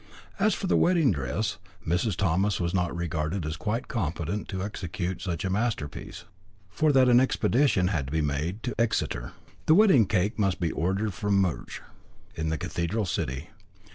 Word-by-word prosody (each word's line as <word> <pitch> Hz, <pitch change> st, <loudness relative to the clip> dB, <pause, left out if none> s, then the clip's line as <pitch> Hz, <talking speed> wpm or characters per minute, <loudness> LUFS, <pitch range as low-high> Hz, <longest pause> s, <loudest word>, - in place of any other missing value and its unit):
As 205 Hz, 0 st, +3 dB
for -, -, -4 dB
the 185 Hz, -, +2 dB
wedding 170 Hz, -8 st, +4 dB
dress, 65 Hz, -7 st, -2 dB, 0.3 s
Mrs. 90 Hz, +4 st, +1 dB
Thomas 95 Hz, +3 st, +1 dB
was 85 Hz, 0 st, -1 dB
not 90 Hz, -2 st, 0 dB
regarded 85 Hz, +1 st, -2 dB
as 80 Hz, +1 st, -3 dB
quite 115 Hz, +5 st, -3 dB
competent 85 Hz, -1 st, -3 dB
to 95 Hz, -1 st, -4 dB
execute 95 Hz, -2 st, -4 dB
such 85 Hz, -2 st, -3 dB
a -, -, 0 dB
masterpiece. 105 Hz, -, -3 dB, 0.5 s
For 155 Hz, -, +2 dB
that 130 Hz, -2 st, +5 dB
an 120 Hz, -1 st, +6 dB
expedition 130 Hz, -6 st, +2 dB
had 75 Hz, -8 st, -1 dB
to -, -, -7 dB
be 80 Hz, +1 st, +1 dB
made 75 Hz, +8 st, -2 dB
to 125 Hz, -, -2 dB
Exeter. 60 Hz, -, -1 dB, 0.3 s
The 155 Hz, -, +7 dB
wedding 185 Hz, -, +6 dB
cake 105 Hz, +3 st, 0 dB
must 95 Hz, -3 st, +1 dB
be 85 Hz, -2 st, 0 dB
ordered 95 Hz, +5 st, -1 dB
from 105 Hz, +2 st, 0 dB
Murch, 95 Hz, -4 st, -2 dB, 0.5 s
in 80 Hz, -1 st, -2 dB
the 80 Hz, -, -1 dB
cathedral 85 Hz, +9 st, -2 dB
city. 70 Hz, 0 st, -3 dB
95 Hz, 170 wpm, -27 LUFS, 85-110 Hz, 0.5 s, The